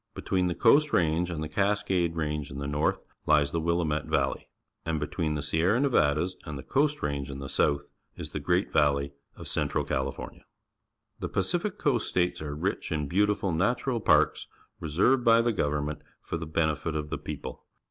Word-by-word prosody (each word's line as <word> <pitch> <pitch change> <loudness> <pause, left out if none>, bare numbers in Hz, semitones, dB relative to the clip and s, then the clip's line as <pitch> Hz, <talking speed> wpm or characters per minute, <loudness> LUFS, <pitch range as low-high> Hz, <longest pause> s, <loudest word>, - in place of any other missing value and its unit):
Between 90 -1 0
the 85 - -1
Coast 150 +6 +4
Range 85 +1 +2
and 80 -3 -3
the - - -3
Cascade 95 -1 0
Range 75 -2 -2
in 70 - -8
the 70 - -4
north 75 +2 0 0.3
hes 75 -2 +4
the 85 - -1
Willamette 80 -2 0
Valley, - - -1 0.3
and 80 -2 -1
between 75 +1 -2
the 75 - -3
Sierra 85 - +2
Nevadas 90 - +2
and 75 -3 -6
the 70 - -8
Coast 150 +2 0
Range 70 -1 -2
in 70 - -6
the 70 0 -6
south 70 +1 +1 0.3
is 75 - -8
the 75 - -3
Great 90 +6 0
Valley 70 -1 +2 0.2
of - - -9
Central - - -1
California. 65 0 -4 0.8
The - - -4
Pacific 175 - -1
Coast 125 -6 +1
States 90 -1 0
are 75 -1 -4
rich 90 +5 -2
in 75 -3 -1
beauti 105 +6 +2
ful 95 - -1
natural 115 +8 0
parks, - - +3 0.3
reserved 100 - +2
by 115 -1 +6
the 115 0 +2
govermnent 75 -3 -1 0.2
for - - -5
the 80 -1 -4
benefit 80 0 -1
of 75 -1 -3
the - - -2
people. - - -7
80 Hz, 185 wpm, -28 LUFS, 75-95 Hz, 0.8 s, by